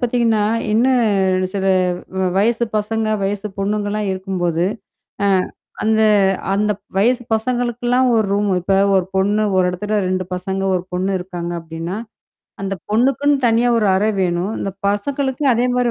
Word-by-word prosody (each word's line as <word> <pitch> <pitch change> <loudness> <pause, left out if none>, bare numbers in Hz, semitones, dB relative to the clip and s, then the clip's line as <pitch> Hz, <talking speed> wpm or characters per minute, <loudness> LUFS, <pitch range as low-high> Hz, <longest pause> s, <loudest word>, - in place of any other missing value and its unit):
பார்த்தீங்கன்னா, 235 -3 +1 0.3
இன்னும் 210 -6 +2
சில 195 -1 -2 0.5
வ 190 - +1
வயசு 230 +4 +2
பசங்க 220 +1 -1 0.2
வயசு 200 +1 -2
பொண்ணுங்கலாம் 205 0 -1
இருக்கும்போது 180 -3 -1 0.6
அ - - +3 0.6
அந்த 220 0 +2 0.5
அந்த 210 +1 +1 0.3
வயசு 245 +4 +2
பசங்களுக்கெல்லாம் 245 +2 0
ஒரு 220 -2 +2
ரூம் 205 +1 +1
இப்ப 185 +3 -1 0.2
ஒரு 190 - +3
பொண்ணு 205 +3 +2
ஒரு 185 - +4
இடத்துல 210 +4 -2
2 185 0 -1
பசங்க 190 +1 -3
1 180 - 0
பொண்ணு 185 +2 -1
இருக்காங்க 175 -1 -5
அப்பிடின்னா, 165 +3 -6 0.7
அந்த 195 0 -2 0.2
பொண்ணுக்குன்னு 275 +6 +2
தனியா 230 +1 +3
ஒரு 210 - +1
அறை 210 +3 +2
வேணும். 180 +3 -1
இந்த 195 - -2 0.2
பசங்களுக்கும் 265 +6 0
அதே 240 +2 +1
மாதிரி 245 -1 +1
210 Hz, 140 wpm, -19 LUFS, 190-235 Hz, 0.7 s, ஒரு